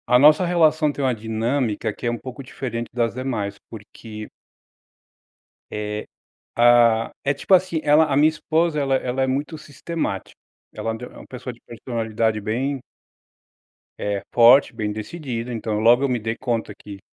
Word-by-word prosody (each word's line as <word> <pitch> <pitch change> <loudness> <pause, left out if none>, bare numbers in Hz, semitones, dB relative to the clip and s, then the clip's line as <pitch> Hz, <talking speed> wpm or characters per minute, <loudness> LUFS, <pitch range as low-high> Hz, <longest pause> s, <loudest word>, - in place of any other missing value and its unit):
A 125 - +6
nossa 155 +6 +6
relação 160 -3 +3
tem 145 - -4
uma 130 - +2
dinâmica 110 +1 -1
que - - -9
é - - +1
um 120 - -3
pouco 130 +2 -8
diferente 120 -3 -5
das 115 -1 0
demais, 110 -6 -3
porque 110 0 -10 1.4
Eh, 105 0 -4 0.5
ah, 120 -1 +5
é 140 - +2
tipo, 145 +7 0
assim, 180 -3 +3
ela 150 +2 +5
a 145 -3 -1
minha 150 +2 +5
esposa 160 0 0
ela 135 -2 +1
ela 130 0 -1
é 130 - +2
muito 145 +4 -2
sistemática, 150 - -5 0.3
ela 115 - -3
é - - -3
und 115 +2 -8
é - - -5
uma - - -13
pessoa 125 0 -7
de 120 - -20
personalidade 115 -2 -2
bem 130 +7 -2 1.2
eh, 100 -1 -2
forte, 120 +4 +6
bem 105 -2 -3
decidida, 120 +1 -5
então, 110 -2 -2
logo 120 +4 +5
eu 140 - +1
me 125 -2 0
dei 115 +1 -3
conta 115 -3 -2
que, 100 -1 -11
120 Hz, 170 wpm, -22 LUFS, 110-140 Hz, 1.4 s, A